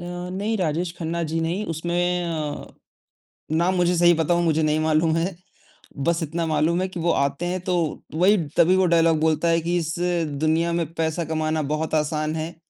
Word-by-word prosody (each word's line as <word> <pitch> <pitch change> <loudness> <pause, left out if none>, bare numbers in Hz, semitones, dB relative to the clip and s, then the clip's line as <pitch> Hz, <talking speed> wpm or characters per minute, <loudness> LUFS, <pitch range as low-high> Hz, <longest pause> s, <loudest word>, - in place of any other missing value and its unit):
अ, - - -7 0.3
नहीं 205 +4 -2
राजेश 170 0 -1
खन्ना 170 0 -2
जी 165 - 0
नहीं 175 +6 -2
उसमें 175 +2 -1
अ, 155 -3 -4 0.9
नाम 175 +3 +2
मुझे 180 0 +2
सही 175 0 +6
बताऊँ 170 +2 +1
मुझे 160 -1 +1
नहीं 155 0 +1
मालूम 160 +1 +2
है, 170 +2 -1 0.6
बस 170 +5 0
इतना 165 +2 -2
मालूम 160 +3 +1
है 185 - 0
कि 185 -2 -7
वो 170 +1 +1
आते 140 +3 0
हैं 185 +1 -2
तो 180 - +2 0.4
वही 190 +6 +4 0.2
तभी 175 +2 +5
वो 190 0 +3
डायलॉग 165 -1 +4
बोलता 160 +1 +1
है 165 - +3
कि 170 +2 -1
इस 165 0 -2 0.4
दुनिया 160 +3 +1
में 170 -1 0
पैसा 160 +1 -1
कमाना 155 0 -1
बहुत 160 +1 -3
आसान 155 0 -1
है, 160 +2 -4
165 Hz, 190 wpm, -23 LUFS, 155-175 Hz, 0.9 s, सही